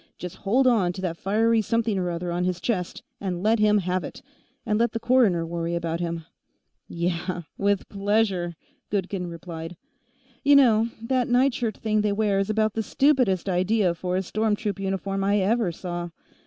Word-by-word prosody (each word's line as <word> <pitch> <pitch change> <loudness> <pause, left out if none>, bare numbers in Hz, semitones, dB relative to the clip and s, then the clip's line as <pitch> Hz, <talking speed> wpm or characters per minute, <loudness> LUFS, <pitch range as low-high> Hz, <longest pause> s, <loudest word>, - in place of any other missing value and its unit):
Just 180 -1 -7
hold 245 +7 +2
on 210 -8 +3
to 185 - -7
that 175 -3 -2
fiery 220 +5 +2
something 225 -1 0
or 180 -1 -1
other 175 +1 -3
on 175 +1 -1
his 180 -1 -1
chest 180 -6 -2 0.2
and 185 -2 -3
let 220 +1 +3
him 210 0 +4
have 185 -1 -1
it, - - -9 0.4
and 215 -2 +1
let 235 -1 +1
the 230 - -2
coroner 230 -8 +3
worry 170 0 -3
about 170 -1 -2
him." 170 -2 -3 0.6
"Yeah. 175 +1 -2
With 200 -1 0
pleasure," 200 -4 0 0.3
Goodkin 190 -2 -2
replied. 170 0 -7 0.7
"You 285 0 +6
know, 230 -5 +5
that 250 +1 +1
nightshirt 245 -3 +1
thing 215 -1 0
they 210 -1 +1
wear 205 -2 +1
is 195 +1 -1
about 215 0 +1
the 225 - -1
stupidest 250 - +2
idea 185 +1 +2
for 180 +2 -3
a 190 - -1
storm 215 +3 0
troop 205 -2 -4
uniform 195 0 -2
I 200 +1 +2
ever 205 0 +1
saw. 175 0 -5
195 Hz, 180 wpm, -25 LUFS, 175-220 Hz, 0.7 s, You